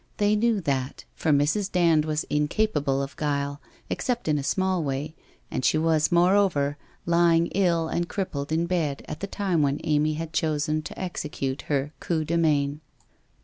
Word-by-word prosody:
They 205 0 +3
knew 220 -1 +2
that, 135 -4 -2
for - - -2
Mrs. 155 +8 +2
Dand 165 -4 +3
was 155 0 -1
incapable 150 -3 0
of 140 - -7
guile, 145 -1 -2 0.3
except 245 -6 -2
in 150 -1 +2
a - - -4
small 185 +3 0
way, 140 +2 -3 0.4
and - - -2
she 155 - +3
was, 160 0 +2
moreover, 175 -5 +3 0.3
lying 170 -1 +4
ill 170 -4 +2
and 170 +1 -2
crip 195 -2 -3
pled 140 +1 -4
in 165 +2 +1
bed 165 -6 -1
at 155 - -6
the 200 - -4
time 190 -5 0
when 140 0 +1
Amy 155 0 +2
had 160 0 -5
chosen 155 0 0
to - - -9
execute 150 -7 -3
her 145 +1 0
coup 160 -3 -1
de 170 - -1
main. 150 -3 +1
155 Hz, 175 wpm, -26 LUFS, 145-175 Hz, 0.4 s, lying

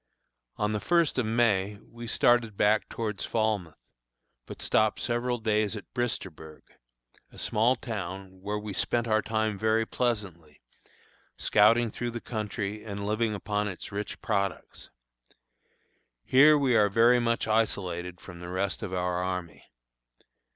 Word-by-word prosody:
On 105 0 -1
the 105 - -1
first 170 0 +2
of 120 - 0
May 105 -3 +1
we 120 0 -9
started 115 -2 +2
back 105 +1 +2
toward 110 -3 -4
Falmouth, 105 -8 -1 0.7
but - - -9
stopped 110 -1 +2
several 120 +1 -1
days 110 -1 0
at 105 - -10
Bristersburg, 90 -10 -4 0.7
a - - -16
small 115 +4 +2
town, 95 -5 -6
where 105 +2 -2
we 105 -1 -6
spent 120 +4 0
our 110 -1 +3
time 110 -2 -1
very 110 +1 +2
pleasantly, 100 -12 -3 0.8
scouting 115 +2 +4
through 120 +2 -3
the 120 0 -5
country 105 -2 -4
and 100 -2 -5
living 110 +1 0
upon 105 +1 -2
its 95 -3 -7
rich 105 +1 -5
products. 100 -3 -3 1.4
Here 150 +4 +7
we 135 -4 +2
are 105 -2 +5
very 115 +4 +5
much 115 -1 0
isolated 90 -5 -1
from 90 -2 -11
the 90 0 -8
rest 95 +2 -2
of - - -5
our 90 0 -1
army. 90 -2 -5
105 Hz, 140 wpm, -28 LUFS, 100-115 Hz, 1.4 s, Here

